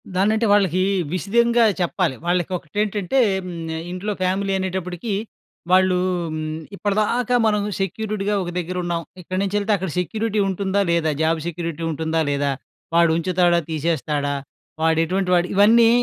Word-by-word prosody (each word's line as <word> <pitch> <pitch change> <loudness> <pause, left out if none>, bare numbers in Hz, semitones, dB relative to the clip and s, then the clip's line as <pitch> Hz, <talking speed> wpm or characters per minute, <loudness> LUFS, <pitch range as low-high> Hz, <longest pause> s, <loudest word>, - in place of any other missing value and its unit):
దాన్నంటే 215 +4 +2
వాళ్ళకి 185 -3 +3 0.3
విశిదంగా 235 +6 +2 0.2
చెప్పాలి. 175 -4 0
వాళ్ళకి 175 0 0
ఒకటేంటంటే 205 - -2 0.3
హ్మ్. - - -6 0.4
ఇంట్లో 185 +4 -3
ఫ్యామిలీ 195 +2 0
అనేటప్పటికి 185 +2 -3 0.6
వాళ్ళు 185 0 +4 0.4
హ్మ్. 155 - -3 0.4
ఇప్పటిదాకా 215 +5 0
మనం 210 -1 +2 0.2
సెక్యూరిటీగా 205 +1 -2
ఒక 175 - -5
దగ్గర 180 +1 -4
ఉన్నాం. 170 -1 -1 0.2
ఇక్కడినుంచెల్తే 200 +4 -1
అక్కడ 190 -2 -4
సెక్యూరిటీ 215 +3 -1
ఉంటుందా 195 +1 0
లేదా? 165 -2 +2
జాబ్ 160 +1 +2
సెక్యూరిటీ 170 -1 -4
ఉంటుందా 160 +1 -1
లేదా? 140 0 0 0.4
వాడు 170 -1 +5
ఉంచుతాడా 175 0 +2
తీసేస్తాడా? 150 -2 -1 0.5
వాడు 160 0 +3
ఎటువంటి 185 +2 -1
వాడు? 175 +1 +2
ఇవన్నీ 225 +3 +6
185 Hz, 125 wpm, -22 LUFS, 170-205 Hz, 0.6 s, ఇవన్నీ